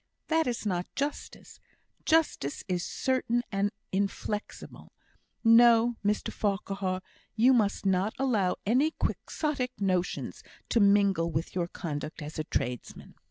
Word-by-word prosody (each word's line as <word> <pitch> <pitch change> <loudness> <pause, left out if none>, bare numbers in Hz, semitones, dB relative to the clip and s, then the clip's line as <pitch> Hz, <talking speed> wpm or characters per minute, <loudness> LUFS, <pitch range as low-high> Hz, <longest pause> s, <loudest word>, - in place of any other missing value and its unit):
"That 320 -2 +2
is 240 -2 -2
not 180 -3 -1
justice 285 +1 -5 0.5
justice 315 - +1
is 180 -2 -1
certain 250 -2 0
and 200 0 +1 0.2
inflexible. 200 +2 -4 0.5
No! 230 0 +6
Mr 205 +1 0
Farquhar, 195 -2 -2 0.3
you 240 +4 +5
must 210 -4 +1
not 190 +2 +1
allow 220 -9 +1
any 265 +9 +2
Quixotic 270 -5 -2
notions 185 -3 -1 0.3
to 235 - +3
mingle 200 -4 +4
with 160 +1 -3
your 175 -2 -1
conduct 150 -2 -5
as 150 +1 -7
a - - 0
tradesman." 125 -4 -4
205 Hz, 120 wpm, -29 LUFS, 185-240 Hz, 0.5 s, No